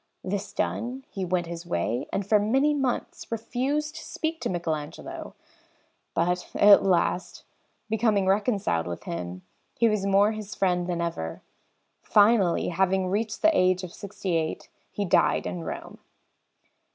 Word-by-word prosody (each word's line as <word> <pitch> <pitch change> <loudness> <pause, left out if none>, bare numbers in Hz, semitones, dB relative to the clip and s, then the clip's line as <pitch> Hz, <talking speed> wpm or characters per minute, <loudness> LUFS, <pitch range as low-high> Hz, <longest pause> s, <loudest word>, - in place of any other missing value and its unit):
This 200 +1 -3
done, 250 +5 -3
he 195 - -4
went 180 -1 0
his 170 0 -6
way 120 - -2
and 195 - -1
for 210 +1 +4
many 265 +8 +2
months 270 -5 -2
refused 270 +7 -2
to 315 - -8
speak 320 +1 -3
to - - -1
Michelagnolo; 160 -4 -4 0.8
but 180 +2 0
at 205 0 +8
last, 180 0 0 0.4
becoming 215 -2 +2
reconciled 195 - +1
with 85 -1 -5
him, 90 +2 -5 0.3
he 235 - +3
was 210 -3 0
more 200 +2 +4
his 215 -1 -6
friend 180 -2 +1
than 175 -1 -1
ever. 80 - -4 0.6
Finally, 205 -4 +4
having 190 +1 +1
reached 215 +3 -2
the 320 0 +5
age 185 -2 +3
of 180 -1 -7
sixty 195 -3 -4
eight, 160 -1 -3 0.2
he 205 - -3
died 175 - +3
in 175 -2 -4
Rome. - - -7
195 Hz, 145 wpm, -26 LUFS, 175-220 Hz, 0.8 s, at